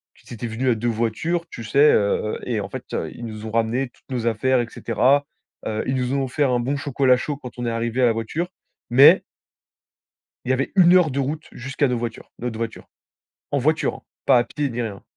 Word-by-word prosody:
qu'ils - - -13
étaient 120 +1 -5
venus 120 +4 -1
à - - +2
2 120 +2 -2
voitures, 120 +10 -1
tu 120 - -8
sais, 140 +7 +5
heu, 105 +1 +1
et 120 -4 -1
en 100 - -5
fait, - - -7 0.3
ils 120 - -8
nous 110 -1 -7
ont 110 - -5
ramené, 115 +3 0
toutes - - -30
nos 120 -2 -1
affaires, 125 +3 +2
et 120 - -3
cetera. 130 +7 +2 0.4
Heu, 110 0 -2
ils 130 - 0
nous 125 0 -1
ont 140 -1 +1
offert 135 +1 0
un 125 - +2
bon 135 +4 -1
chocolat 135 -3 +2
chaud 145 +2 -3
quand 125 -4 -10
on 120 - -3
est 115 - 0
arrivés 115 +2 -1
à - - +6
la 115 - +4
voiture, 130 +11 -3 0.4
mais 130 +4 +7 1.2
il - - -4
y - - +4
avait 135 +1 -1
1 180 -2 +7
heure 175 -5 +4
de 135 - -2
route 150 +3 -3
jusqu'à 135 +3 -1
nos 125 - 0
voitures 115 -1 -6
notre 120 -2 -4
voiture. 115 -1 -5 0.6
En 140 - +1
voiture 155 +4 +1
hein, - - -12 0.2
pas 125 - +6
à - - +2
pied, 145 +4 -3
ni 120 0 -3
rien. 105 -4 -5
125 Hz, 230 wpm, -22 LUFS, 115-140 Hz, 1.2 s, mais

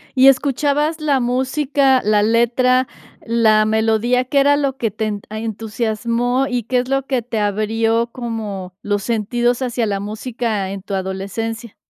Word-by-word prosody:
¿Y 260 0 +6
escuchabas 285 +3 +2
la 290 -3 +2
música, 265 +2 +1
la 210 0 +3
letra, 240 +3 +2 0.4
la 220 -2 +3
melodía, 220 +3 +1
qué 280 +2 +1
era 285 +1 +4
lo 275 -2 -1
que 225 -5 -1
ten 215 -1 -3
a 215 +1 -5
entusiasmó? 230 +3 -1
Y, 245 -2 -2
¿qué 250 +4 -1
es 250 +1 -3
lo 270 0 0
que 255 -3 0
te 230 -1 -3
abrió 225 +3 0
como 210 -7 -5
los 205 -1 -1
sentidos 240 +3 0
hacia 240 -2 -1
la 200 -1 -1
música 215 -1 -3
en 195 -1 -6
tu 200 - -7
adolescencia? 200 +4 -4
230 Hz, 155 wpm, -19 LUFS, 215-255 Hz, 0.4 s, Y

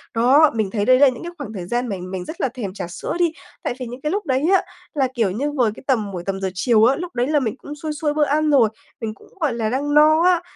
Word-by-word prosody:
Đó, 275 +6 +5
mình 215 -3 0
thấy 205 -2 -1
đấy 255 +2 +5
là 285 - +7
những 250 - -7
cái 345 - -6
khoảng 250 -7 -7
thời 180 -3 -6
gian 240 +4 -1
mình 185 -2 -5
mình 185 -1 -4
rất 320 - -7
là 265 - +1
thèm 230 -7 -6
trà 185 - -5
sữa 175 - -5
đi. 345 -2 +3 0.3
Tại - - -1
vì 255 - -4
những 245 +2 -8
cái 300 +2 -1
lúc 410 +1 -2
đấy 265 +1 0
á, - - +4 0.3
là, 275 -3 +1
kiểu 225 -7 +1
như, 280 +9 -2
vừa 245 -7 +1
cái - - -13
tầm 220 -7 +1
buổi 175 -2 -5
tầm 195 0 -3
giờ 190 - -1
chiều 220 +3 +3
á, 260 +3 +4
lúc 355 -2 -7
đấy 245 +2 +1
là 300 -1 +2
mình 230 -5 -2
cũng 290 +2 -9
xuôi 305 +1 -4
xuôi 295 0 -1
bữa 300 0 +2
ăn 305 +2 +1
rồi, 255 -7 +5 0.3
mình 220 -1 -3
cũng, - - -19
gọi 300 -8 +1
là, 225 -2 -1
đang 285 +4 -1
no 310 +2 +6
á, 360 -1 +4
255 Hz, 300 wpm, -21 LUFS, 215-295 Hz, 0.3 s, là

